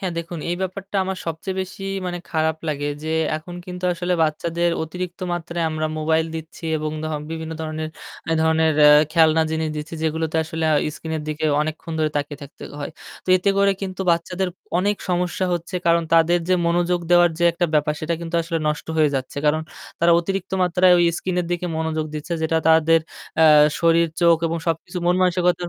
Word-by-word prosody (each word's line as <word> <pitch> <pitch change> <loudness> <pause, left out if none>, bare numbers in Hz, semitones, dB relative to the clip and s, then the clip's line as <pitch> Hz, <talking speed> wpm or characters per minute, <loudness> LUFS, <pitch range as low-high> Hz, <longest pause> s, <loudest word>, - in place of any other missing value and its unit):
হ্যাঁ, 185 -2 -2
দেখুন 170 0 -5
এই 175 - -1
ব্যাপারটা 195 +1 -4
আমার 190 0 -3
সবচেয়ে 165 +4 -4
বেশি 190 +1 -7 0.2
মানে 175 0 -3
খারাপ 160 0 +1
লাগে 145 -1 -2 0.2
যে 155 - -5 0.3
এখন 165 +3 -9
কিন্তু 180 0 -6
আসলে 175 +1 -2
বাচ্চাদের 170 +2 0
অতিরিক্ত 180 +2 -6
মাত্রায় 170 -1 -3
আমরা 155 0 -1
মোবাইল 160 +1 +1
দিচ্ছি 160 +1 -8
এবং 155 0 -3
ধ - - -2 0.2
বিভিন্ন 160 0 -5
ধরনের 155 0 -4 0.4
এধরণের 160 0 +2 0.4
খেলনা 160 -1 +5
জিনিস 160 0 -1
দিচ্ছি 150 +2 -6
যেগুলোতে 160 0 -1
আসলে 160 0 -3
আ - - +4 0.2
স্ক্রিনের 160 -1 -4
দিকে 155 +1 -3 0.2
অনেকক্ষণ 155 +2 -4
ধরে 155 -1 +1
তাকিয়ে 145 -1 -3
থাকতে 140 - -12 0.2
হয়। 145 - -5 0.3
তো - - -16
এতে 190 +2 +1
করে 200 0 +4
কিন্তু 190 -1 -5
বাচ্চাদের 180 +2 0 0.3
অনেক 200 +3 +1
সমস্যা 180 +1 0
হচ্ছে 175 +2 -6
কারণ 170 0 +4
তাদের 165 +1 +5
যে 185 - +4
মনোযোগ 175 +1 +1
দেওয়ার 175 0 +6
যে 175 - +2
একটা 175 +1 0
ব্যাপার 150 0 +2
সেটা 165 +2 -1
কিন্তু 170 0 -6
আসলে 165 0 -2
নষ্ট 150 0 -3
হয়ে 155 -2 +4
যাচ্ছে 130 0 -4
কারণ 155 +1 +2 0.4
তারা 170 0 +4
অতিরিক্ত 190 +2 -4
মাত্রায় 180 +1 +4
ওই 175 - +4
স্ক্রিনের 180 -1 -2
দিকে 175 0 -1
মনোযোগ 160 -1 -1
দিচ্ছে 150 +3 -5
যেটা 160 0 +1
তাদের 160 0 +5 0.4
আ - - +7 0.4
শরীর 170 0 +4
চোখ 170 -1 +6
এবং 165 +1 -1
সবকিছু 165 +2 -2
মন 175 - +4
মানসিকতার 180 -1 +1
165 Hz, 180 wpm, -22 LUFS, 160-175 Hz, 0.4 s, আ